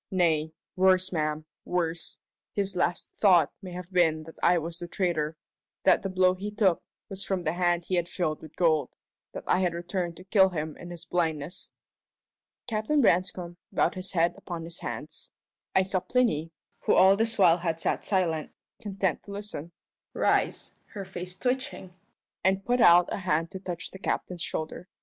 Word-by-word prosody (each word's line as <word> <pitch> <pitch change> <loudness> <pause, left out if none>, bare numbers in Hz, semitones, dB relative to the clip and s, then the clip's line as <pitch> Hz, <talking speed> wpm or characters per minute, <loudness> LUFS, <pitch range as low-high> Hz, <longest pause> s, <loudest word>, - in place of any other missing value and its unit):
Nay 160 -4 +2 0.2
worse, 185 0 +4
ma'am, 155 -2 -1 0.2
worse 170 -2 -2 0.4
his 195 -2 -1
last 180 0 0
thought 180 -7 +5
may 185 -2 -8
have 180 +1 -8
been 160 -3 +3
that 160 +1 -11
I 180 - +5
was 165 +1 -4
the 175 - -5
traitor 165 -4 -1 0.5
that - - +5
the 195 - -3
blow 185 0 +4
he 195 +3 -5
took 205 -4 +2 0.3
was 195 -1 -4
from 190 -2 -2
the 155 - 0
hand 175 -1 +1
he - - -4
had 175 -1 +1
filled 155 -4 -2
with 155 -1 -12
gold 160 -4 +2 0.4
that - - -6
I - - +2
had 180 -2 +1
returned 175 0 -3
to 185 - -11
kill 190 0 +5
him 155 -3 -4
in 175 - -9
his 175 -1 -8
blindness!" 165 0 -2 1.0
Captain 225 +6 0
Branscome 180 -5 +1
bowed - - +2
his 185 +2 -3
head 170 -1 +3
upon 170 -2 -6
his 165 +1 -6
hands. - - -6 0.4
I 190 - +5
saw 185 0 0
Plinny 180 -9 +1 0.3
who - - +2
all 190 +1 +7
this 225 +2 0
while 175 -3 +6
had 165 -2 -1
sat - - -1
silent, 170 -6 0 0.3
content 195 -5 -1
to 200 - -9
listen 200 -6 -6 0.4
rise, - - +1 0.2
her 200 -2 -5
face 180 -1 -7
twitching, 250 -6 -2 0.5
and 190 +1 +2
put 245 0 +2
out 175 -2 +6
a - - -1
hand 165 -3 0
to 190 - -6
touch 175 -3 -6
the 190 - -10
captain's 180 -2 -2
shoulder. 160 +2 -3
180 Hz, 175 wpm, -28 LUFS, 165-190 Hz, 1.0 s, all